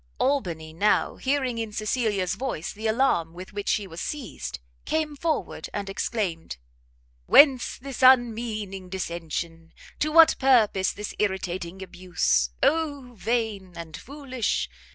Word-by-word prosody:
Albany 170 - -1
now, 205 +6 +1
hearing 260 -3 0
in 225 -1 -3
Cecilia's 210 -4 0
voice 215 -8 -4
the 220 +2 -4
alarm 220 -9 +1
with 185 +2 -10
which 205 0 -3
she 210 - +1
was 175 -2 -8
seized, 150 - -5 0.3
came 310 -2 -1
forward 315 +2 -2
and 200 -1 -3
exclaimed, 190 - -3 0.7
"Whence 270 -4 +6
this 270 0 -7
unmeaning 225 -7 +3
dissension? 170 -2 -5 0.3
to 305 - 0
what 330 0 +7
purpose 225 -8 +4
this 210 0 -6
irritating 190 -2 -2
abuse? 175 - 0
Oh 285 -5 0
vain 215 -4 -2
and 165 -2 -7
foolish! 265 - -3
210 Hz, 125 wpm, -26 LUFS, 180-260 Hz, 0.7 s, what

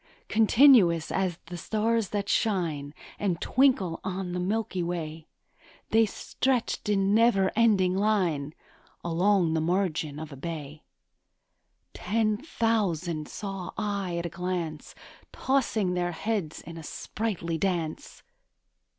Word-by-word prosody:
Continuous 220 - +5
as 185 -3 0
the 175 +1 -7
stars 220 +3 0
that 200 -1 -2
shine 165 -12 0 0.3
And 185 -5 0
twinkle 240 -11 +2
on 190 -1 -3
the 180 - -2
milky 190 0 -1
way, 165 -2 -4 0.6
They 225 0 +5
stretched 250 0 -1
in 195 -1 +2
never 215 -4 +4
ending 200 -5 +3
line 180 -8 0 0.5
Along 175 0 +2
the 160 - +1
margin 165 -4 -1
of 155 0 -7
a - - -8
bay; 150 0 -6 1.1
Ten 215 +2 0
thousand 195 - -1
saw 195 -3 -6
I 200 -5 -2
at 170 - -3
a - - -2
glance, 170 -3 -4 0.4
Tossing 230 -8 0
their 175 -1 -1
heads 200 -4 -3
in 165 -1 -9
sprightly 170 -1 -3
dance. 170 -4 -3
185 Hz, 115 wpm, -27 LUFS, 165-215 Hz, 1.1 s, Continuous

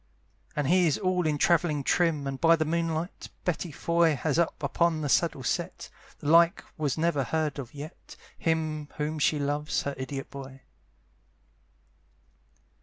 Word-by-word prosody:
And 150 - 0
he 175 +4 +4
is 150 - +1
all 185 -3 +1
in 150 -1 +1
travelling 155 -2 +2
trim, 160 -2 +1
And 135 -1 -4
by 165 0 +6
the 155 -1 0
moonlight, 165 +2 -2 0.2
Betty 175 -1 -1
Foy 170 +1 +2
Has 150 +4 0
up 165 -2 0
upon 160 +3 +1
the 145 - -2
saddle 160 -2 +2
set, 120 - -3 0.3
The - - -7
like 170 +2 +5
was 150 -3 -1
never 160 -3 +1
heard 155 0 -1
of 135 +2 -8
yet, 150 +4 -10 0.2
Him 155 -2 -1
whom 155 +1 -2
she 150 +1 +3
loves, 145 +1 -1
her 140 - -2
idiot 135 +1 -5
boy. 135 -1 -9
155 Hz, 155 wpm, -28 LUFS, 145-170 Hz, 0.3 s, by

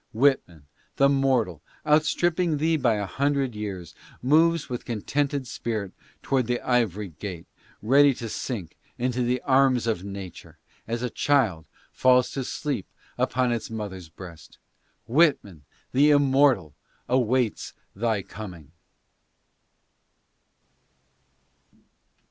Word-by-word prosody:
Whitman, 110 - +1 0.3
the 140 - +4
mortal, 130 - +1 0.2
outstripping 160 +2 +2
thee 160 +2 +1
by 120 -7 +2
a 105 -1 -2
hundred 140 +3 0
years, 95 -5 -6 0.3
moves 165 +4 +3
with 125 -1 -5
contented 140 +5 -2
spirit 110 -5 -4 0.3
toward 130 -4 0
the 120 0 0
ivory 105 -6 0
gate, 85 +2 -8 0.4
ready 140 +4 +5
to 115 - -6
sink 110 -5 -5 0.2
into 125 0 -1
the 125 +1 0
arms 130 -3 +3
of 110 -6 -1
nature, 100 -3 -9 0.3
as 115 +2 -3
a 125 - -2
child 115 - +1 0.2
falls 125 -1 +3
to 135 - -3
sleep 135 -5 -3 0.3
upon 125 -1 +1
its 115 -2 -3
mother's 100 -6 -6
breast. 85 -2 -12 0.5
Whitman, 115 - +1 0.3
the 140 +3 +4
immortal, 135 - +3 0.3
awaits 125 -2 0 0.2
thy 110 -1 -1
coming. 90 -10 -10
120 Hz, 110 wpm, -25 LUFS, 100-135 Hz, 0.5 s, ready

